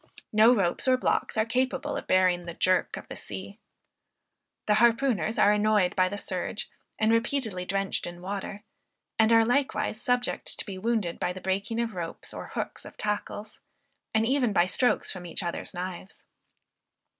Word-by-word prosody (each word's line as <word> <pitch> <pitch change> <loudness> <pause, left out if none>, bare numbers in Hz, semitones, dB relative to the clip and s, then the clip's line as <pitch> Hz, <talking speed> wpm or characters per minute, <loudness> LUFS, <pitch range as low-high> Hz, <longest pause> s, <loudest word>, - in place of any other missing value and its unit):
No 215 +3 +7
ropes 195 +2 0
or 255 0 +5
blocks 255 - 0
are 220 - +3
capable 255 +3 -1
of - - -5
bearing 185 -2 +3
the 170 - -6
jerk 185 0 +2
of - - -9
the - - -7
sea. - - -8 1.1
The 210 - +3
harpooners 230 -4 +3
are 205 - +6
annoyed 210 -3 +3
by 185 -1 +3
the 205 - -4
surge, 190 +1 -4 0.3
and 220 0 +3
repeatedly 230 -5 0
drenched 195 0 -1
in 175 0 -8
water; 200 +2 -5 0.6
and 220 0 +5
are 225 0 +6
likewise 245 -2 0
subject 245 0 0
to - - -3
be 190 -3 -6
wounded 215 -5 -1
by 180 - -1
the 185 - -7
breaking 195 +5 -1
of 230 -2 -1
ropes 170 -3 -6
or - - -6
hooks - - -4
of - - -12
tackles, 210 0 -4 0.5
and 220 0 +2
even 250 -3 +2
by 175 - +4
strokes 245 +7 +1
from 180 -2 -7
each 170 - -4
other's 170 -1 -4
knives. 185 +1 -7
210 Hz, 170 wpm, -28 LUFS, 185-230 Hz, 1.1 s, No